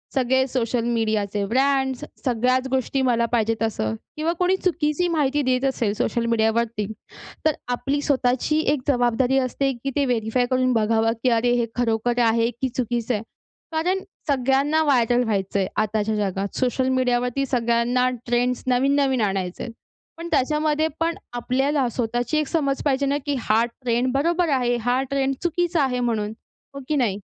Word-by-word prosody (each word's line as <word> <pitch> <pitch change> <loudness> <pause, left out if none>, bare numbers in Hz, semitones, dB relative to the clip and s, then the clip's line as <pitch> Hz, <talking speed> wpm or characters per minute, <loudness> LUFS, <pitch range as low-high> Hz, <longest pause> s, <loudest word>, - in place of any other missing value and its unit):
सगळे 260 0 +2
सोशल 240 -2 -1
मीडियाचे 215 -3 0
ब्रँड्स, 265 +3 +1
स - - -5 0.2
सगळ्याच 255 +1 +1
गोष्टी 265 +1 0
मला 240 -3 +2
पाहिजे 225 -1 +1
तसं 110 - -1 0.2
किंवा 320 +2 0
कोणी 365 +1 +3
चुकीची 335 -1 +1
माहिती 295 -4 +1
देत 255 0 +1
असेल 235 -6 0
सोशल 235 +2 -1
मीडियावरती, 225 -1 +1 0.6
तर 310 - +4
आपली 275 +4 -1
स्वतःची 265 +2 +1
एक 285 - -2
जबाबदारी 245 0 +2
असते, 270 +1 0
की 275 - -1
ते 285 - +2
व्हेरिफाय 245 0 0
करून 255 0 +2
बघावं, 225 0 +2
की 255 - +4
अरे! 240 +1 +2
हे 240 -1 +1
खरोखर 240 0 0
आहे, 230 +1 +2
की 250 +3 -3
चुकीचं 240 -1 -1
आहे? 215 0 -2 0.5
कारण 355 +4 0 0.3
सगळ्यांना 280 +3 +2
व्हायरल 245 -4 +3
व्हायचं 200 -3 -1
आहे, 190 - 0
आताच्या 215 0 0
जगात. 200 -1 -2
सोशल 260 0 +1
मीडियावरती 250 +1 +1
सगळ्यांना 245 0 +1 0.2
ट्रेंड्स 245 +1 0
नवीन-नवीन 265 0 +2
आणायचे 190 -3 -2
आहेत, 230 - -7 0.4
पण 335 +1 -6
त्याच्यामध्ये 300 +2 +1
पण 330 0 0 0.2
आपल्याला 265 +3 0
स्वतःची 240 +5 -1
एक 305 -2 0
समज 280 -5 0
पाहिजे 280 0 +2
ना, 280 +1 +1
की 290 -1 0
हा 225 0 +2
ट्रेंड 240 +1 -1
बरोबर 335 +4 +1
आहे, 245 -3 +1
हा 245 +3 0
ट्रेंड 275 -1 +1
चुकीचा 345 -1 +1
आहे. 250 -2 0
म्हणून 220 -4 -1 0.4
हो 275 - -7
की 305 - 0
नाही? 230 -8 +1
250 Hz, 160 wpm, -23 LUFS, 230-275 Hz, 0.6 s, तर